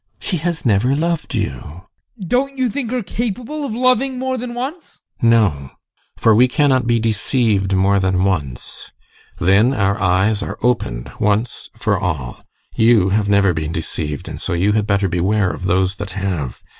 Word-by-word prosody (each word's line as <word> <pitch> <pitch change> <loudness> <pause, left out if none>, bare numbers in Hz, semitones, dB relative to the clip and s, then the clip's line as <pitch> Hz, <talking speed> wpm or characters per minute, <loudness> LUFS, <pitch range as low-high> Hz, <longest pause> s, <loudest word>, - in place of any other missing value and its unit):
She 180 - -1
has 165 0 -3
never 120 +4 +2
loved 165 +1 -2
you! 75 +7 -4 0.4
ADOLPH. 185 - -6
Don't 275 +6 0
you 255 -2 +1
think 265 -3 -3
her 250 -1 -2
capable 240 - -4
of 230 -6 -4
loving 255 +1 +2
more 260 0 -2
than 245 -1 -5
once? 280 +8 -6 0.2
GUSTAV. 115 - +4
No, 85 - +2 0.5
for 110 - +4
we 120 +4 +5
cannot 130 -2 +2
be 120 -1 +2
deceived 110 -3 +1
more 100 +1 +3
than 95 -1 +1
once. 75 -11 -3 0.5
Then 100 +9 +3
our 100 -2 0
eyes 100 +3 +2
are - - -5
opened 65 - -1
once 110 +2 -1
for - - 0
all. 70 -8 -3 0.3
You 110 -4 +4
have 100 +1 +1
never 100 -2 +4
been 80 0 -3
deceived, 75 -3 -4
and - - -7
so - - -2
you 95 +4 +2
had 105 0 0
better 100 -1 +1
beware 95 +3 +1
of 95 - -7
those 95 +1 +1
that 100 - -4
have. 90 -10 -3
105 Hz, 175 wpm, -19 LUFS, -, 0.5 s, we